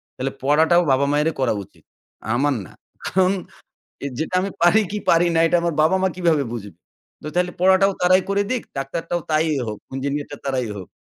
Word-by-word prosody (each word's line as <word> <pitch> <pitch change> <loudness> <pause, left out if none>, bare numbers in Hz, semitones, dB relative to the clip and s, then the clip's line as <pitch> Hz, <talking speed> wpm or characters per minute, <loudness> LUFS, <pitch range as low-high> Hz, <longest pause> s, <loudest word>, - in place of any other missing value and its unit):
তাহলে 135 +1 -3
পড়াটাও 160 +5 +4
বাবা 135 +2 +3
মায়েরই 150 +2 +1
করা 130 -4 +2
উচিত। 90 -4 -22 0.5
আমার 145 +3 +2
না। - - -14 0.3
কারণ 185 0 +2 0.7
এ - - 0
যেটা 160 +3 -2
আমি 195 0 -3
পারি 210 +6 +5
কী 210 - -2
পারি 170 +1 +4
না, 165 - +4
এটা 175 - +3
আমার 170 -1 -1
বাবা-মা 190 +4 +3
কীভাবে 170 -5 +2
বুঝবে?" 100 -7 -8 0.5
তো - - -5
তাইলে 180 0 +1
পড়াটাও 190 +1 +5
তারাই 185 +1 +4
করে 200 +1 +1
দিক, 250 - 0 0.2
ডাক্তারটাও 165 +5 -3
তাই 155 +1 +3 0.2
হোক, 105 - -4 0.2
ইঞ্জিনিয়ারটা 140 +1 -3
তারাই 130 -3 -1
হোক। 95 - -8
160 Hz, 180 wpm, -21 LUFS, 135-180 Hz, 0.7 s, পারি